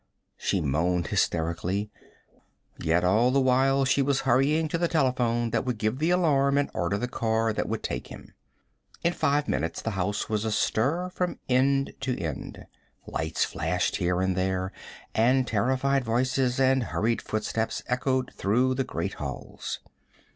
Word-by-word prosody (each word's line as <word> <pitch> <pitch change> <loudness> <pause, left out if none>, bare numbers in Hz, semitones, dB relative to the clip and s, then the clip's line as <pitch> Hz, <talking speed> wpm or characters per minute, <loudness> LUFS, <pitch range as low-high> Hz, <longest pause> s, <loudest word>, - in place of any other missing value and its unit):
she - - 0
moaned 85 +5 0
hysterically; 85 +5 -1 0.9
yet 85 +2 +1
all 105 +7 +4
the 135 +2 +3
while 135 +1 +3
she 135 +1 +3
was 135 0 +1
hurrying 135 +5 +2
to 165 +2 -2
the 170 - +2
telephone 125 -7 +1
that 115 - +1
would 125 -3 -2
give 110 +4 -1
the 160 +3 +1
alarm 140 -6 +3
and 145 - 0
order 85 +4 0
the 125 - -2
car 115 -2 0
that - - -2
would - - -3
take - - -4
him. - - -12 0.7
In 170 - +2
five 145 -2 +1
minutes 80 - -1
the 115 - -3
house 100 +1 -2
was 110 -1 -1
astir 130 - 0
from 180 -1 -2
end 135 +2 +2
to 130 -2 -2
end. 80 -7 -5 0.4
Lights 80 0 -1
flashed 90 +4 -1
here 90 0 0
and 95 -1 +1
there, 95 0 -1 0.4
and 125 +4 +3
terrified 130 +5 +1
voices 125 +2 +1
and 130 -2 +3
hurried 115 +2 0
footsteps 110 +1 -2
echoed 130 0 -1
through 125 +6 +1
the 135 +1 0
great 95 -3 -3
halls. 70 -3 -5
120 Hz, 155 wpm, -27 LUFS, 100-135 Hz, 0.9 s, all